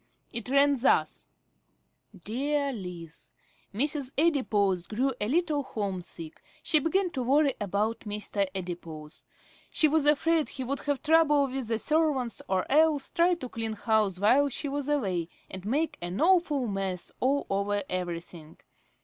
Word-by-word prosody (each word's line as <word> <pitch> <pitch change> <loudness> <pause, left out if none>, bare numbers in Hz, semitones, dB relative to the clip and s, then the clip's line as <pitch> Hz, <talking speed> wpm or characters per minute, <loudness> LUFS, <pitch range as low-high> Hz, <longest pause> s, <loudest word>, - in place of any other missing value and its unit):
It 235 +1 -4
ran 280 0 +4
thus: 250 - +1 1.0
DEAR 280 +5 -1
LIZ, 175 -6 -9 0.4
Mrs. 275 +4 -1
Adipose 210 - +1
grew 260 +5 0
a 210 - 0
little 310 +1 +1
home 200 -8 -4
sick. 165 -2 -9 0.2
She 310 - +4
began 360 +4 0
to 265 - -3
worry 275 +3 +3
about 205 +3 -1
Mr. 205 -1 -2
Adipose. 170 -4 -7 0.5
She 310 - +3
was 300 -1 +2
afraid 310 +1 +3
he 265 - -5
would 275 +3 -2
have 285 -2 -2
trouble 305 -2 +4
with 265 -2 -4
the 225 0 0
servants, 290 -5 0
or 190 -1 0
else 300 -1 +3
try 350 +1 +3
to 320 -7 -7
clean 225 -2 -3
house 215 -3 +1
while 265 +8 +4
she 285 +3 -3
was 285 0 -3
away, 190 - 0 0.2
and 190 0 -7
make 295 +9 -1
an 175 +3 -4
awful 335 -6 +3
mess 195 -3 -3
all 275 +3 +1
over 200 +1 0
everything. 170 -3 -5
255 Hz, 150 wpm, -28 LUFS, 195-295 Hz, 1.0 s, ran